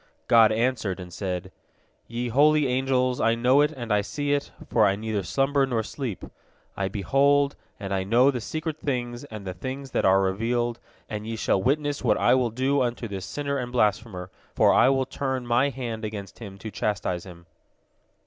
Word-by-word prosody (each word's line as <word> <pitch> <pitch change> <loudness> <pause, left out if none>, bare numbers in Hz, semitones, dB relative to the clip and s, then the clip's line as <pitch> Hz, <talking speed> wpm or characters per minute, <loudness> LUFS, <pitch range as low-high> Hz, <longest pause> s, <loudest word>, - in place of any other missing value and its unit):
God 115 -2 +6
answered, 110 -4 0
and 90 -1 -9
said: 95 -1 -4 0.6
"Ye 120 +1 -3
holy 150 +4 +4
angels, 130 -1 +1
I 115 0 +3
know 125 +4 +4
it 150 +1 +2
and 120 -7 -3
I 105 - +3
see 145 +7 -2
it, 145 0 -1 0.2
for - - +3
I 100 - +2
neither 110 0 -2
slumber 135 - +1
nor 115 -4 0
sleep. 120 - -5 0.5
I 95 - -1
behold 140 +8 +2 0.2
and 100 -2 -4
I 95 -1 0
know 120 +7 +4
the 125 -3 -4
secret 155 +4 -4
things 120 -2 -3
and 110 -6 -9
the 95 - -4
things 130 +8 -6
that - - 0
are 95 +1 +4
revealed, 115 +5 -1 0.3
and 105 0 -5
ye 115 - -3
shall 100 -3 +1
witness 145 +4 0
what - - +3
I 120 - +4
will 130 -2 +2
do 130 +5 +1
unto 120 -1 -2
this 95 -3 -6
sinner 140 -1 -2
and 125 -1 -4
blasphemer, 105 -5 0 0.2
for - - +5
I 130 - +5
will 135 -1 +2
turn 130 -1 -3
My 120 +4 +2
hand 120 -5 -5
against 105 -2 -6
him 100 -4 -9
to 110 +2 -7
chastise 95 -5 -2
him." 85 -2 -13
120 Hz, 190 wpm, -25 LUFS, 105-135 Hz, 0.6 s, God